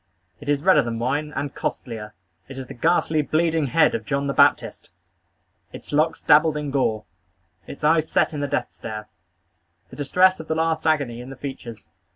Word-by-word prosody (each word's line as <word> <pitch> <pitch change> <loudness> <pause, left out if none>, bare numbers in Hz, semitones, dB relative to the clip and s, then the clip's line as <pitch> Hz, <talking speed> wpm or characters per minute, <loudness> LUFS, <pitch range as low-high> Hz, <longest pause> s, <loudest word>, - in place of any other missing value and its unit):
It 145 - -8
is 145 0 +1
redder 190 - +5
than 115 -1 -4
wine, 145 +6 -2
and 140 -1 -3
costlier. 105 -3 -5 0.3
It 135 - -10
is 135 - -6
the - - -10
ghastly, 155 +3 +1
bleeding 160 0 0
head 165 - +3
of 230 - -3
John 140 -1 -2
the 140 - -1
Baptist! - - +2 0.8
Its - - -10
locks 160 +2 +1
dabbled 155 0 +4
in 150 -2 -4
gore. 110 -6 0 0.6
Its 140 - -10
eyes 160 +1 +3
set - - +1
in 150 - -4
the 145 - -1
death - - -2
stare. 110 -2 -8 0.8
The - - -10
distress 180 +6 +3
of 160 - -9
the 160 - -1
last 160 0 0
agony 140 -7 0
in 125 - -10
the 135 - -8
features. 130 -4 -8
145 Hz, 190 wpm, -23 LUFS, 130-160 Hz, 0.8 s, redder